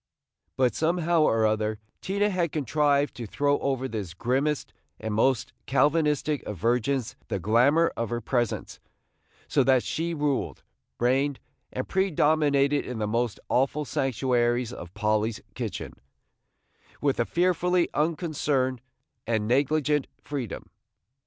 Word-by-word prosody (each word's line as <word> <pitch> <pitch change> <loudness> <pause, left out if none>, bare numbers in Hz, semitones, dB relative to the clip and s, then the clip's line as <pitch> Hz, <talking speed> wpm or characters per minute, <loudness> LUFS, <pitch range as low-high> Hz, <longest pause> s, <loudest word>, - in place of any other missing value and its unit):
But 125 -2 +3
somehow 170 0 +1
or 115 -7 +3
other 110 0 0 0.2
Tina 200 +2 0
had 175 -4 0
contrived 145 0 +1
to 120 -2 -5
throw 145 +6 +1
over 130 -1 -1
this 100 -8 -5
grimmest 135 +8 -1 0.3
and 110 -1 -3
most 120 +3 +1
Calvinistic 150 0 +2
of 105 - -6
virgins 125 - 0
the - - -2
glamour 125 - +3
of 115 -2 -2
her 120 - -2
presence, 120 0 -2 0.7
so 140 - +3
that 130 -1 +4
she 170 +1 -2
ruled, 145 -3 -1 0.4
reigned, 135 +3 +1 0.3
and 130 - -4
predominated 150 -6 +2
in 125 - -5
the 110 - -1
most 115 +1 -1
awful 140 +4 +1
sanctuaries 120 -1 0
of 85 -6 -9
Polly's 110 +1 0
kitchen, - - -5 1.1
with 140 -3 0
a - - +4
fearfully 180 +1 +2
unconcerned 150 -5 0 0.5
and 110 -2 0
negligent 145 +3 +2
freedom. 135 -8 -6
135 Hz, 125 wpm, -27 LUFS, 120-150 Hz, 1.1 s, that